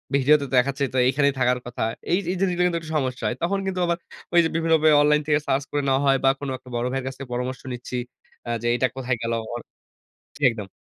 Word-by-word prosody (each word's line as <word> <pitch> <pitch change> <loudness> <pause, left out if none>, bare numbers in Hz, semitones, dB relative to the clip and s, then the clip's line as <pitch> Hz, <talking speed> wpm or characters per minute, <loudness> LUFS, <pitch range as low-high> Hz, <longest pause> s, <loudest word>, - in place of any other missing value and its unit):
ভিডিওতে 140 +1 +4
দেখাচ্ছে, 135 +2 +2
তো - - -1
এখানেই 140 +1 +2
থাকার 125 0 +2
কথা। 120 0 -6 0.3
এই 175 - +4
এই - - -2
জিনিসগুলো 180 -2 +1
কিন্তু 170 -1 -1
একটু 160 -1 -8
সমস্যা 130 -3 -2
হয়। 125 - -1
তখন 195 +3 +1
কিন্তু 190 -1 -2
আবার 170 0 0 0.4
ওইযে 170 -1 +5
বিভিন্নভাবে 160 -1 +3
বে - - +6
অনলাইন 150 0 +4
থেকে 150 -1 +3
সার্চ 135 +1 +1
করে 145 - 0
নেওয়া 135 0 +2
হয় 135 0 +5
বা, 135 - +6
কোনো 140 -2 -4
একটা 130 0 -16
বড় 120 +1 -1
ভাইয়ের 135 0 -2
কাছ 130 - -4
থেকে 135 -2 -8
পরামর্শ 125 +1 -3
নিচ্ছি, 125 +1 -5 0.5
আ - - -4
যে, 120 - -2
এইটা 130 +1 +2
কোথায় 125 -2 -1
গেলো? 115 0 -1 0.2
অন 120 - -5 0.7
জ্বী, 145 - -8
একদম। 105 -4 -7
135 Hz, 235 wpm, -24 LUFS, 125-155 Hz, 0.7 s, বে